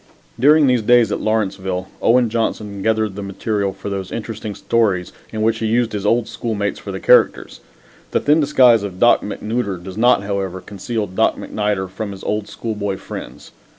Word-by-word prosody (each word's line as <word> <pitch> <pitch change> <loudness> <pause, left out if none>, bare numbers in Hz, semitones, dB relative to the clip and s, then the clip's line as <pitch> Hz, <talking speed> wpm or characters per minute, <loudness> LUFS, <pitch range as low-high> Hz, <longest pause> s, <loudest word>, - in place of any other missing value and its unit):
During 150 +4 +6
these 125 -3 +3
days 120 +1 +4
at - - -1
Lawrenceville 95 -4 -1
Owen 120 -1 +3
Johnson 105 -3 -2
gathered 110 -1 +1
the 100 - -5
material 100 0 -2
for - - -9
those 95 -2 -4
interesting 110 -2 -5
stories 100 -6 0 0.2
in 110 -1 -2
which 110 0 +1
he 110 - -1
used 115 +1 +1
his 105 -1 -3
old 115 +1 +2
schoolmates 110 -3 -3
for - - -7
the - - -5
characters. - - +3 0.5
The - - +1
thin 150 +2 +3
disguise 130 -6 +5
of 95 -3 -6
Doc 120 +3 +5
Macnooder 105 -1 -3
does 95 +3 -9
not, 120 -3 +4
however, 100 -2 -3
conceal 105 +3 -4
Doc 95 -1 +1
MacNider 105 -3 -2
from 100 +2 -6
his 95 - -11
old 105 0 -2
schoolboy 105 -2 -4
friends. - - -9
105 Hz, 180 wpm, -19 LUFS, 100-115 Hz, 0.5 s, During